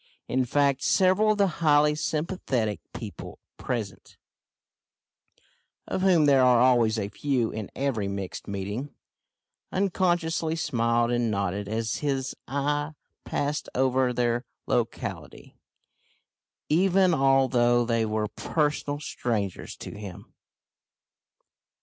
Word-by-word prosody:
In 130 Hz, 0 st, +1 dB
fact 140 Hz, +1 st, +2 dB
several 195 Hz, +6 st, +3 dB
of -, -, -6 dB
the 200 Hz, -, +4 dB, 0.2 s
highly 150 Hz, -1 st, +4 dB
sympathetic 150 Hz, -, -2 dB
people -, -, -8 dB, 0.2 s
present 105 Hz, -6 st, -5 dB, 1.7 s
of -, -, -2 dB
whom 180 Hz, -5 st, +4 dB
there 140 Hz, -2 st, +5 dB
are 125 Hz, -2 st, +5 dB
always 120 Hz, -3 st, +4 dB
a 100 Hz, -2 st, -2 dB
few 125 Hz, +1 st, -1 dB
in 110 Hz, -3 st, -5 dB
every 130 Hz, -7 st, -1 dB
mixed 100 Hz, -1 st, -5 dB
meeting 100 Hz, +8 st, -5 dB, 0.8 s
unconsciously 175 Hz, -4 st, 0 dB
smiled 115 Hz, -5 st, +1 dB
and 120 Hz, -1 st, +1 dB
nodded 100 Hz, -1 st, -2 dB
as 110 Hz, +1 st, -2 dB
his 135 Hz, -2 st, -2 dB
eye 145 Hz, +3 st, -1 dB, 0.3 s
passed 145 Hz, +1 st, -2 dB
over 130 Hz, 0 st, +2 dB
their 120 Hz, 0 st, 0 dB, 0.2 s
locality, -, -, -3 dB, 1.1 s
even 185 Hz, +2 st, +3 dB
although 130 Hz, -4 st, +3 dB
they 115 Hz, -1 st, +1 dB
were 110 Hz, -1 st, -1 dB
personal 145 Hz, +3 st, -1 dB
strangers 110 Hz, -, -3 dB
to -, -, -8 dB
him. 100 Hz, -4 st, -10 dB
130 Hz, 105 wpm, -26 LUFS, 115-150 Hz, 1.7 s, there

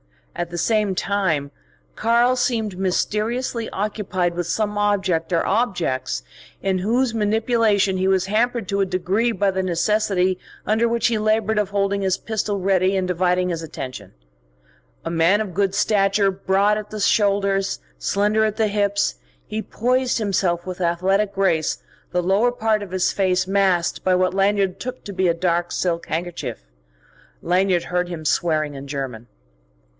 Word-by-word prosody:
At 175 Hz, -1 st, -3 dB
the 175 Hz, -, -6 dB
same 210 Hz, +1 st, +1 dB
time, 175 Hz, -8 st, 0 dB, 0.4 s
"Karl" 235 Hz, +3 st, +3 dB
seemed 225 Hz, -6 st, -1 dB
mysteriously 220 Hz, +5 st, -1 dB
occupied 195 Hz, -3 st, -2 dB
with 175 Hz, 0 st, -3 dB
some 210 Hz, +2 st, -1 dB
object 195 Hz, -5 st, 0 dB
or 170 Hz, -, +1 dB
objects 185 Hz, -, -1 dB, 0.4 s
in 190 Hz, -1 st, 0 dB
whose 235 Hz, +5 st, +1 dB
manipulation 215 Hz, -2 st, +2 dB
he 190 Hz, +1 st, +1 dB
was 190 Hz, -1 st, +2 dB
hampered 225 Hz, +1 st, 0 dB
to 200 Hz, 0 st, 0 dB
a -, -, +3 dB
degree 190 Hz, +5 st, 0 dB
by 200 Hz, -2 st, +1 dB
the 190 Hz, 0 st, -1 dB
necessity 185 Hz, 0 st, +1 dB, 0.3 s
under 220 Hz, +2 st, +2 dB
which 235 Hz, -1 st, +1 dB
he 230 Hz, -2 st, 0 dB
laboured 215 Hz, 0 st, +1 dB
of 205 Hz, -2 st, 0 dB
holding 200 Hz, 0 st, 0 dB
his 190 Hz, -1 st, +1 dB
pistol 215 Hz, -2 st, -2 dB
ready 190 Hz, 0 st, +2 dB
and 185 Hz, -1 st, -1 dB
dividing 180 Hz, 0 st, +1 dB
his 165 Hz, -2 st, -3 dB
attention. 130 Hz, -, -7 dB, 0.9 s
A 165 Hz, -, -2 dB
man 170 Hz, +5 st, +3 dB
of 200 Hz, -4 st, -5 dB
good 195 Hz, +1 st, 0 dB
stature, 195 Hz, -1 st, +2 dB
broad 195 Hz, +2 st, +1 dB
at 210 Hz, -, -9 dB
the 215 Hz, -, -6 dB
shoulders, 200 Hz, -1 st, +1 dB, 0.2 s
slender 210 Hz, -, +1 dB
at 215 Hz, -1 st, 0 dB
the 215 Hz, -1 st, +1 dB
hips, 200 Hz, 0 st, +1 dB, 0.3 s
he 215 Hz, +1 st, -4 dB
poised 250 Hz, +3 st, 0 dB
himself 185 Hz, -5 st, 0 dB
with 185 Hz, 0 st, -6 dB
athletic 190 Hz, +4 st, +1 dB
grace 170 Hz, -5 st, +1 dB, 0.3 s
the 180 Hz, -, 0 dB
lower 200 Hz, +7 st, +3 dB
part 220 Hz, -3 st, 0 dB
of 205 Hz, -, -7 dB
his 185 Hz, 0 st, +1 dB
face 185 Hz, -2 st, +1 dB
masked 190 Hz, -3 st, +1 dB
by 185 Hz, -1 st, +3 dB
what 185 Hz, 0 st, +1 dB
Lanyard 195 Hz, -1 st, +1 dB
took 255 Hz, +1 st, -6 dB
to 200 Hz, -, -7 dB
be 185 Hz, -1 st, +1 dB
a 170 Hz, -, +3 dB
dark 175 Hz, 0 st, 0 dB
silk 170 Hz, -2 st, -1 dB
handkerchief. 160 Hz, -, -4 dB, 0.8 s
Lanyard 180 Hz, 0 st, +2 dB
heard 180 Hz, 0 st, -1 dB
him 165 Hz, -3 st, -6 dB
swearing 155 Hz, -2 st, +1 dB
in 140 Hz, 0 st, -8 dB
German. 130 Hz, -5 st, -5 dB
195 Hz, 160 wpm, -22 LUFS, 180-215 Hz, 0.9 s, Karl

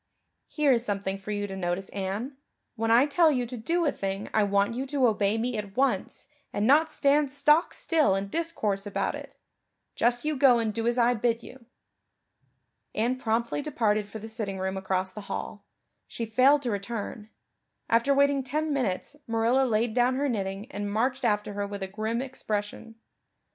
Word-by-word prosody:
"Here 300 Hz, -3 st, +2 dB
is 235 Hz, -2 st, +3 dB
something 195 Hz, -3 st, -2 dB
for 200 Hz, -, -10 dB
you 205 Hz, -1 st, -1 dB
to 195 Hz, -1 st, -6 dB
notice, 185 Hz, +1 st, -2 dB
Anne. 200 Hz, +8 st, -4 dB, 0.4 s
When 225 Hz, -1 st, -1 dB
I 235 Hz, +4 st, +6 dB
tell 315 Hz, +2 st, +4 dB
you 250 Hz, -4 st, 0 dB
to 245 Hz, +2 st, -7 dB
do 335 Hz, +9 st, 0 dB
a 290 Hz, -, +3 dB
thing 195 Hz, +1 st, -4 dB
I 215 Hz, -, +3 dB
want 200 Hz, +1 st, +2 dB
you 260 Hz, +3 st, -3 dB
to 275 Hz, -2 st, +1 dB
obey 210 Hz, -2 st, +2 dB
me 240 Hz, +2 st, -1 dB
at 200 Hz, 0 st, -8 dB
once 255 Hz, -8 st, 0 dB, 0.3 s
and 205 Hz, -, -1 dB
not 305 Hz, +5 st, +4 dB
stand 285 Hz, -1 st, +2 dB
stock 300 Hz, +3 st, +3 dB
still 310 Hz, -, +2 dB
and 195 Hz, 0 st, -3 dB
discourse 215 Hz, -12 st, -2 dB
about 205 Hz, -, -1 dB
it. -, -, -9 dB, 0.6 s
Just 240 Hz, +3 st, +1 dB
you 305 Hz, 0 st, 0 dB
go 260 Hz, -3 st, +5 dB
and 225 Hz, -2 st, -1 dB
do 230 Hz, +2 st, -2 dB
as 240 Hz, +1 st, +1 dB
I 240 Hz, 0 st, +4 dB
bid 230 Hz, 0 st, 0 dB
you." 245 Hz, -2 st, -13 dB, 1.3 s
Anne 240 Hz, +4 st, +1 dB
promptly 235 Hz, +3 st, -1 dB
departed 215 Hz, -8 st, 0 dB
for 220 Hz, -, -7 dB
the 220 Hz, +1 st, -8 dB
sitting 215 Hz, -3 st, -3 dB
room 190 Hz, 0 st, -2 dB
across 190 Hz, -1 st, -1 dB
the 210 Hz, -, -8 dB
hall; -, -, -5 dB, 0.4 s
she 230 Hz, -, -5 dB
failed 260 Hz, +6 st, +4 dB
to 240 Hz, -, -1 dB
return; 210 Hz, +1 st, -5 dB, 0.6 s
after 230 Hz, +5 st, +3 dB
waiting 280 Hz, 0 st, +3 dB
ten 300 Hz, +4 st, -2 dB
minutes 255 Hz, -1 st, -2 dB
Marilla 230 Hz, +4 st, +2 dB
laid 220 Hz, 0 st, +1 dB
down 245 Hz, +1 st, +2 dB
her 285 Hz, +2 st, 0 dB
knitting 195 Hz, -4 st, -3 dB
and 205 Hz, -3 st, -4 dB
marched 250 Hz, +5 st, 0 dB
after 210 Hz, -2 st, 0 dB
her 205 Hz, 0 st, -2 dB
with 200 Hz, -1 st, -5 dB
a -, -, -3 dB
grim 220 Hz, +5 st, -2 dB
expression. 225 Hz, -3 st, -4 dB
230 Hz, 185 wpm, -27 LUFS, 205-265 Hz, 1.3 s, I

